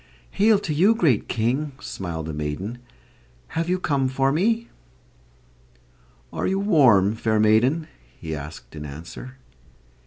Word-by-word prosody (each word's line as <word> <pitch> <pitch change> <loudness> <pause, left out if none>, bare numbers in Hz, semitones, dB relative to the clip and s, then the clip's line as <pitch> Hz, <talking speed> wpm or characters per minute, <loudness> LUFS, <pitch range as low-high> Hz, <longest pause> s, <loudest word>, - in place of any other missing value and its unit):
"Hail 215 +1 +4
to 175 -6 -3
you, 195 +9 +4
great 155 - +2
King!" 130 +6 -1
smiled 85 -4 -5
the 80 - -5
maiden. 75 +11 -4 0.7
"Have 165 +1 -2
you 180 - +2
come 140 -7 0
for 135 +1 +1
me?" 225 +9 +1 1.7
"Are - - -1
you 190 - 0
warm, 130 - +4
fair 110 -1 0
maiden?" 120 +9 +3 0.3
he 80 -1 -5
asked 75 +2 -9
in 75 - -7
answer. 85 - -9
130 Hz, 130 wpm, -23 LUFS, -, 1.7 s, Hail